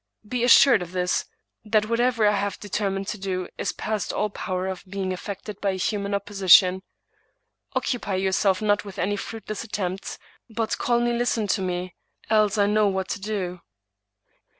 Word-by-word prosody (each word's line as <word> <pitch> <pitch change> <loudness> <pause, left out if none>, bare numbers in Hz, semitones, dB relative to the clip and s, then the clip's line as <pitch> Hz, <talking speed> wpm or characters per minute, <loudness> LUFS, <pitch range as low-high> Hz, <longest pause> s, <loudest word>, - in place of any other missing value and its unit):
Be 245 +1 -1
assured 245 -2 +7
of 175 0 -7
this 180 0 0 0.2
— - - -50
^that 215 -1 +4
whatever 230 0 +2
I 210 - +5
have 200 0 -2
determined 195 -1 -2
to 210 - -4
do 185 -2 -3
is - - -1
past 215 -1 -3
all 210 -1 -1
power 185 -2 -3
of 190 -1 -4
being 190 -1 -2
affected 200 +2 -7
by 200 - +1
a 190 - -1
human 200 +2 -2
opposi 200 -1 -3
tion. 185 +2 +8 0.9
Occupy 230 -6 -1
yourself 190 +1 +1
not 205 -1 +2
with 200 -1 -10
any 200 +3 0
fruitless 215 0 -6
attempts, 195 -4 -4 0.3
but 225 0 -2
calmly 240 0 +1
listen 235 -2 0
to 195 - +1
me, 180 -1 -3 0.4
else 215 -1 +3
I 205 - +4
know 210 0 +3
what 190 -1 -2
to - - -3
do." 190 -4 -3
200 Hz, 175 wpm, -24 LUFS, 190-215 Hz, 0.9 s, tion